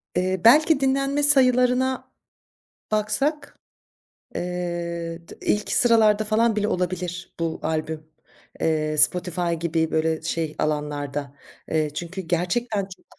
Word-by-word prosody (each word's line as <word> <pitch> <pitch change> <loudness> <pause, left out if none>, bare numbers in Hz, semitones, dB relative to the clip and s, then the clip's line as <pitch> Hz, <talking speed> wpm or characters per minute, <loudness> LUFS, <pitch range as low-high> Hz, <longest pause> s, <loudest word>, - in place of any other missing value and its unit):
Eee, 185 0 0
belki 300 +5 +6
dinlenme 275 +2 +1
sayılarına 255 -2 +3 0.8
baksak, 215 +9 -1 0.8
eee, 170 -1 -4
tı - - -12
ilk 210 0 0
sıralarda 220 -3 +4
falan 220 +1 +2
bile 210 0 0
olabilir 180 -1 -3
bu 165 -1 -2
albüm, 155 0 -2 0.6
eee, 155 -1 0
Spotify 175 +2 +2
gibi 160 -1 0
böyle 160 0 0
şey 160 -1 -3
alanlarda. 145 -2 -2 0.3
Eee, 155 -1 +1
çünkü 175 +4 -5
gerçekten 180 +6 -1
çok 190 -1 -11
180 Hz, 110 wpm, -24 LUFS, 160-230 Hz, 0.8 s, belki